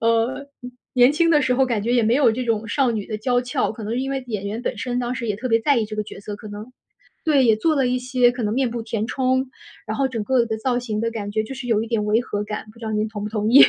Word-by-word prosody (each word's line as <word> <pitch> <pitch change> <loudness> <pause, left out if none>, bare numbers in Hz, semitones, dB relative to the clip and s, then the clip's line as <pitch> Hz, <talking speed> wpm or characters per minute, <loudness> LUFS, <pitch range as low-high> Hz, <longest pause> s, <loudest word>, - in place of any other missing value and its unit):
呃， 230 +5 +1 0.5
年 250 +1 +6
轻 335 +2 +3
的 300 -2 +5
时 255 - +2
候 265 +1 +4
感 230 -5 -1
觉 235 +3 0
也 245 -1 +4
没 225 +2 +3
有 275 -3 +5
这 250 +3 -2
种 225 -2 0
少 260 +4 +2
女 215 -3 -3
的 215 - -3
娇 245 +3 +1
俏。 245 -2 -1
可 225 - -9
能 220 +3 -2
是 250 - 0
因 270 +1 -2
为 270 -1 -2
演 210 -4 -3
员 215 +4 -3
本 - - -2
身 245 -1 -2
当 245 0 -1
时 235 -1 -4
也 210 - 0
特 255 +4 -4
别 225 - +4
在 285 +4 +3
意 225 - +1
这 215 - -7
个 215 - 0
角 205 - -10
色， 205 0 -6
可 215 0 -10
能 210 +4 -8 0.5
对， 290 -4 +4
也 225 -3 +5
做 310 +8 +2
了 270 -3 +2
一 250 0 +1
些 250 -1 +3
可 245 0 -5
能 210 -1 0
面 255 +1 +1
部 235 0 -4
填 220 -1 -2
充， 260 +1 0 0.4
然 220 - -3
后 270 -1 +1
整 230 -5 -3
个 255 -1 +3
的 220 -1 -3
造 245 +2 0
型 220 -4 -3
的 230 0 0
感 210 -3 -4
觉 215 +1 0
就 220 +5 -7
是 260 -1 -7
有 220 -3 +2
一 225 - -4
点 225 -2 0
违 210 +2 +3
和 210 -4 -3
感， 210 +1 -5
不 230 - -19
知 230 - -8
道 220 - -2
您 215 +1 0
同 210 -1 -6
不 210 - -4
同 215 0 0
意。 270 +4 +10
235 Hz, 340 characters per minute, -22 LUFS, 215-255 Hz, 0.5 s, 意